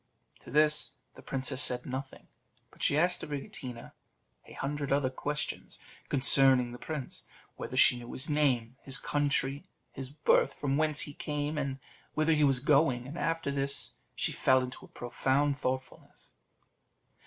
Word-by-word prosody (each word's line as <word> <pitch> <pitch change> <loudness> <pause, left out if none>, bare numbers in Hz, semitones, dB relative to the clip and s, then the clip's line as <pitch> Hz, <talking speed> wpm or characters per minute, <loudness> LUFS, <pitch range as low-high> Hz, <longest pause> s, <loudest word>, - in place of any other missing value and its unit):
To - - -14
this 150 +1 +3 0.2
the - - -14
princess 135 0 0
said 125 -3 +2
nothing, 135 +1 -6 0.4
but - - -17
she 145 - +3
asked 175 +3 +2
Abricotina 135 -4 -6 0.6
a - - -12
hundred 145 0 -3
other 140 -2 +2
questions 145 +3 -4 0.3
concerning 130 -2 +5
the 120 - -9
prince; 150 -5 -6 0.3
whether - - -6
she 125 - +6
knew 120 0 -9
his 130 - -2
name, 130 -5 +1
his 135 0 0
country, 145 +3 0 0.2
his 135 -1 -6
birth, 150 +2 +2
from 140 -2 -1
whence 155 0 +2
he 145 - -1
came, 150 +1 -3
and 140 -3 -2 0.4
whither 155 +1 +3
he 150 -1 +3
was 135 -3 +3
going; 140 -4 +3
and 140 +5 -8
after 165 -3 -1
this 140 0 0 0.2
she - - 0
fell 130 -1 +3
into 125 0 -7
a - - -12
profound 135 +3 0
thoughtfulness. 130 +1 -5
140 Hz, 155 wpm, -30 LUFS, 130-150 Hz, 0.6 s, she